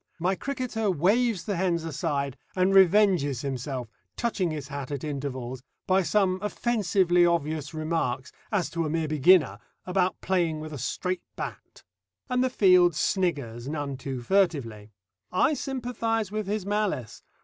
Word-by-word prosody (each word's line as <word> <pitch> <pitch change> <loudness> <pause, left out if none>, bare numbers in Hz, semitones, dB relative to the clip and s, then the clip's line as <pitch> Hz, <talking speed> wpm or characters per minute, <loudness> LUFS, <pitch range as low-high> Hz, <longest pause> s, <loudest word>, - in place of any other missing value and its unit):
My 180 +3 +1
cricketer 245 -2 -2
waves 200 +5 +2
the 205 - -2
hens 170 -2 0
aside, 145 -5 -2 0.2
and 185 +1 +2
revenges 185 - +4
himself, 130 -2 -4 0.3
touching 220 -7 0
his 150 -3 -5
hat 140 -3 -5
at 140 -2 -4
intervals, 130 -4 -4 0.2
by 190 +1 +3
some 185 +1 +1
offensively 200 -5 +2
obvious 155 -3 0
remarks 155 -5 -2 0.2
as 200 -5 0
to 170 0 -1
a 155 - -2
mere 160 0 -1
beginner 150 - +4 0.3
about 185 0 0
playing 170 -4 0
with 155 0 -7
a 145 - -6
straight 180 +8 -2
bat. - - -8 0.5
And 250 0 +2
the 260 - +2
field 180 -7 +5
sniggers 140 - -1
none 145 -2 -3
too 130 -1 -5
furtively. 130 - 0 0.4
I 185 +11 +3
sympathise 235 -6 -2
with 215 -1 -3
his 205 -1 -2
malice. 205 - -2
170 Hz, 145 wpm, -27 LUFS, 140-195 Hz, 0.5 s, field